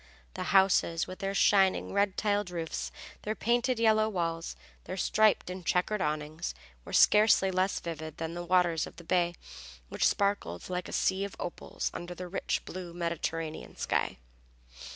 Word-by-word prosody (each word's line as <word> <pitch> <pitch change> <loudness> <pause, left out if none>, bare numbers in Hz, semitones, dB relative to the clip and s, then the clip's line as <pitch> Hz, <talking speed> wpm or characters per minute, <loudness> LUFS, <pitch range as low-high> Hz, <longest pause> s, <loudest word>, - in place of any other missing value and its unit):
The - - -4
houses, 190 -4 +3
with 185 - -9
their 195 0 -2
shining 195 -1 +3
red 200 -1 +1
tiled 205 -2 +1
roofs, 165 -2 -4 0.3
their 215 +1 -3
painted 240 +3 +1
yellow 220 -1 +4
walls, 165 -4 -2 0.3
their 185 - -5
striped 215 -1 +3
and 185 0 -7
checkered 185 +4 +1
awnings, 150 +2 -2 0.3
were - - -10
scarcely 210 -2 +5
less 185 +1 +1
vivid 160 -2 -6
than 165 0 -4
the 175 0 -5
waters 175 -2 +2
of - - -13
the 170 - -12
bay, 175 0 +1 0.5
which - - +2
sparkled 200 - -1
like 180 0 -3
a - - -8
sea 190 +1 +1
of 200 - -5
opals 175 - -4
under 175 +1 -6
the 180 +1 -6
rich 180 - -2
blue 175 -2 -7
Mediterranean 165 -2 -3
sky. - - -1
180 Hz, 160 wpm, -30 LUFS, 170-200 Hz, 0.5 s, scarcely